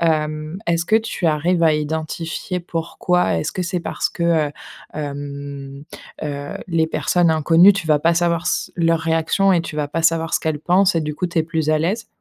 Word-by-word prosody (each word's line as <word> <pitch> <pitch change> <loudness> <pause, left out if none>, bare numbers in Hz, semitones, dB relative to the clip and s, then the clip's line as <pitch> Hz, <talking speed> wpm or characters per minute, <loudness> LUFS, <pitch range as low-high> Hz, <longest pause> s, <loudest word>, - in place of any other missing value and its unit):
Hem, 155 0 -1
est-ce 170 0 +1
que 215 - +1
tu 220 -5 -2
arrives 165 +3 +2
à 160 - +5
identifier 160 +4 -3
pourquoi 170 - -1
est-ce 80 - -2
que 185 - -3
c'est 175 0 -2
parce - - -2
que, 170 - -6
heu, 160 -4 +2 0.4
hem, 140 -1 -6 0.4
heu, 145 -1 -4 0.2
les 165 -1 +1
personnes 170 +1 +1
inconnues 165 +5 +6
tu 185 -5 -4
vas 150 -1 +4
pas 170 +3 +2
savoir 170 0 +1
s 175 - -1
leurs 165 -1 +2
réactions 165 +4 +2
et 175 - +3
tu 160 - -7
vas 150 -1 -2
pas 165 +3 -2
savoir 165 0 +1
ce - - +3
qu'elles 155 -2 -2
pensent 185 +3 +3
et 165 - +2
du 150 -1 -3
coup 180 - -1
tu 170 -1 -2
es 160 - +4
plus 160 -1 -1
à 155 - +3
l'aise? 200 +8 -1
165 Hz, 205 wpm, -20 LUFS, 155-175 Hz, 0.4 s, inconnues